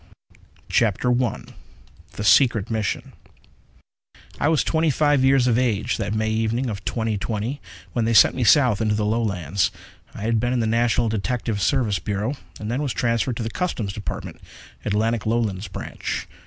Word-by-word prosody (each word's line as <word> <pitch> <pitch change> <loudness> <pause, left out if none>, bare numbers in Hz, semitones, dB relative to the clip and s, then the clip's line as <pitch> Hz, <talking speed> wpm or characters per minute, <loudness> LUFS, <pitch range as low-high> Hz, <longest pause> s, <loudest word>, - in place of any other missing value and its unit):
_ - - -29 0.3
CHAPTER 115 +2 +1
I 120 - -3 0.7
The 105 - -5
Secret 110 +1 +4
Mission 110 -3 -2 1.3
I - - +2
was 160 -1 +3
twenty 160 0 +1
five 145 -1 +2
years 135 -1 +4
of 120 -1 +3
age 110 -5 0
that 105 -1 -2
May 110 0 0
evening 115 +3 0
of 100 -3 -7
2020 110 +3 -2 0.3
when 115 -2 0
they 115 - +1
sent 105 - +7
me 130 - -1
south 120 -4 +4
into 105 -1 +1
the 105 0 0
Lowlands. 100 -6 0 0.5
I - - -6
had 115 0 +1
been 120 +2 0
in 125 - +1
the 115 - +1
National 115 +1 +2
Detective 110 0 -2
Service 105 -1 +1
Bureau, 105 - -2 0.3
and 105 +1 -4
then 130 +4 -1
was 140 -4 -2
transferred 115 0 0
to 115 - -3
the 115 - -4
Customs 115 - -2
Department, 105 - -6 0.4
Atlantic 110 +2 0
Lowlands 110 -4 -1
Branch. - - -5
115 Hz, 170 wpm, -23 LUFS, 105-125 Hz, 1.3 s, sent